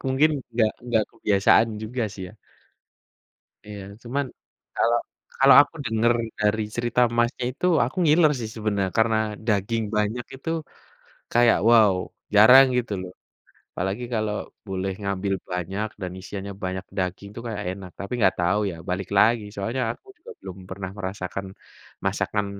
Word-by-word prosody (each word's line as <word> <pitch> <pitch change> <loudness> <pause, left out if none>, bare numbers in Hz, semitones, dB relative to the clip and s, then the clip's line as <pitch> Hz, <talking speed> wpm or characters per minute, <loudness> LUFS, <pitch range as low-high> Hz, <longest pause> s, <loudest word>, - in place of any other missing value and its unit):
mungkin 140 +4 +3 0.2
enggak 115 -2 +2
enggak 120 -3 +1
kebiasaan 105 +2 +3
juga 120 +3 -3
sih 95 - -8
ya. - - -14 1.3
Iya. 105 -1 -8 0.2
Cuman 140 +4 -2 0.5
kalau 120 +1 +3 0.4
kalau 135 +1 +7
aku 145 +3 -4
denger 115 +2 +2 0.3
dari 105 +1 +2
cerita, 120 +1 +1 0.2
Masnya, 120 +1 +1
itu 180 - -4 0.2
aku 130 - -5
ngiler 155 0 +5
sih 110 -2 -4
sebenar 105 -3 -1
karena 110 0 +3 0.3
daging 110 +1 0
banyak 105 +4 -1
itu 135 +5 -6 0.8
kayak, 120 0 +5
wow 110 -4 +6 0.4
jarang 125 +6 +9
gitu 120 -4 -1
loh. 90 -1 -7 0.6
Apalagi 95 +6 -2
kalau 110 -1 -1 0.3
boleh 95 0 -2
ngambil 100 -1 -1 0.2
banyak 95 +4 -3
dan 90 -2 -4
isiannya 100 +1 -6
banyak 95 +1 -3
daging 95 +2 -3
tuh 115 - -6
kayak 105 -3 -4
enak, 95 -2 -10
tapi 100 - -6
enggak 100 -5 +3
tahu 90 +4 +2
ya 85 - -7
balik 90 +1 -2
lagi 115 +1 +4
soalnya 115 +6 -2
aku - - -28
juga 350 - -13
belum 95 -1 -8
pernah 95 -1 -5
merasakan 95 0 -5 0.6
masakan 105 -1 -1
105 Hz, 145 wpm, -24 LUFS, 95-120 Hz, 1.3 s, jarang